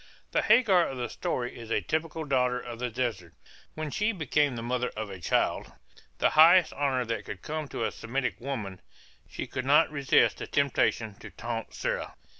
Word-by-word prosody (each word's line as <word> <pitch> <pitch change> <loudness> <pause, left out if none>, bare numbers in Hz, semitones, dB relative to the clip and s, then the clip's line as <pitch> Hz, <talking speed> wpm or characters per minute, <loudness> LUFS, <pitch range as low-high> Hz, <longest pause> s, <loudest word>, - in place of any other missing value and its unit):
The - - +2
Hagar 195 -9 +5
of 135 - -6
the 120 -1 -3
story 120 -1 -3
is 115 -2 -9
a - - +2
typical 160 0 -2
daughter 125 -3 +1
of 120 -2 -8
the 125 0 -2
desert. 110 -8 -3 0.4
When 155 -1 -4
she 210 +8 +1
became 150 - +1
the 115 - -5
mother 125 +1 -1
of 110 -2 -4
a 95 - -8
child, 85 - 0 0.5
the - - +2
highest 165 +2 +7
honor 135 -3 0
that 115 0 -3
could 100 -3 -8
come 155 -1 -4
to 115 - -3
a - - -1
Semitic 125 +1 -3
woman, 110 -9 -5 0.5
she - - -5
could 130 - -4
not 150 +5 +4
resist 140 -2 +3
the - - -5
temptation 120 -5 +1
to - - -10
taunt 115 -1 -5
Sarah. - - -3
125 Hz, 190 wpm, -28 LUFS, 115-150 Hz, 0.5 s, highest